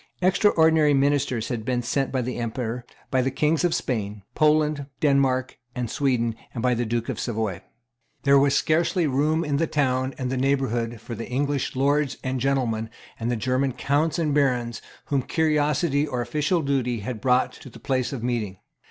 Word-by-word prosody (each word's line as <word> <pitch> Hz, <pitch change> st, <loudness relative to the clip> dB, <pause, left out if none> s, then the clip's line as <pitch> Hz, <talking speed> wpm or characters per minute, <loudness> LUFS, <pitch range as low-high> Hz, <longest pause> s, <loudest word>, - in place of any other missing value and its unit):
Extraordinary 160 Hz, -5 st, +4 dB
ministers 135 Hz, -4 st, +1 dB
had 115 Hz, -3 st, -3 dB
been 125 Hz, +1 st, -1 dB
sent 135 Hz, +3 st, -1 dB
by 130 Hz, -2 st, 0 dB
the 125 Hz, +1 st, -4 dB
Emperor, 120 Hz, 0 st, -3 dB, 0.3 s
by 130 Hz, -1 st, +3 dB
the 130 Hz, -, +1 dB
Kings 150 Hz, +5 st, +1 dB
of 175 Hz, -2 st, +2 dB
Spain, 105 Hz, -5 st, -3 dB
Poland, 150 Hz, -2 st, +2 dB
Denmark, 135 Hz, -3 st, +1 dB, 0.2 s
and 125 Hz, -3 st, -3 dB
Sweden, 125 Hz, -6 st, +1 dB, 0.2 s
and 115 Hz, -, -3 dB
by 125 Hz, -1 st, +3 dB
the 120 Hz, -1 st, -1 dB
Duke 115 Hz, 0 st, -1 dB
of -, -, -3 dB
Savoy. 110 Hz, -6 st, -2 dB, 0.6 s
There 140 Hz, 0 st, +6 dB
was 140 Hz, 0 st, +3 dB
scarcely 170 Hz, +2 st, +2 dB
room 150 Hz, +4 st, +1 dB
in 145 Hz, -1 st, 0 dB
the 165 Hz, +2 st, +1 dB
town 130 Hz, -3 st, 0 dB
and 130 Hz, -2 st, -3 dB
the 130 Hz, -, -1 dB
neighbourhood 125 Hz, -4 st, 0 dB
for 120 Hz, -, -8 dB
the 115 Hz, +1 st, -6 dB
English 140 Hz, +2 st, -1 dB
Lords 140 Hz, +1 st, +1 dB
and 130 Hz, -1 st, -2 dB
gentlemen 120 Hz, -4 st, 0 dB, 0.3 s
and 115 Hz, +1 st, -2 dB
the 120 Hz, -, +1 dB
German 130 Hz, +3 st, 0 dB
Counts 145 Hz, +6 st, 0 dB
and 155 Hz, -4 st, 0 dB
Barons 125 Hz, -5 st, +1 dB, 0.2 s
whom 140 Hz, -2 st, 0 dB
curiosity 150 Hz, 0 st, +1 dB
or 125 Hz, -4 st, -2 dB
official 155 Hz, +6 st, 0 dB
duty 125 Hz, -5 st, 0 dB
had 110 Hz, +1 st, -5 dB
brought 125 Hz, -1 st, +2 dB
to -, -, -12 dB
the -, -, -13 dB
place 130 Hz, -2 st, -1 dB
of 130 Hz, -5 st, -5 dB
meeting. 115 Hz, -6 st, -2 dB
130 Hz, 180 wpm, -24 LUFS, 120-145 Hz, 0.6 s, There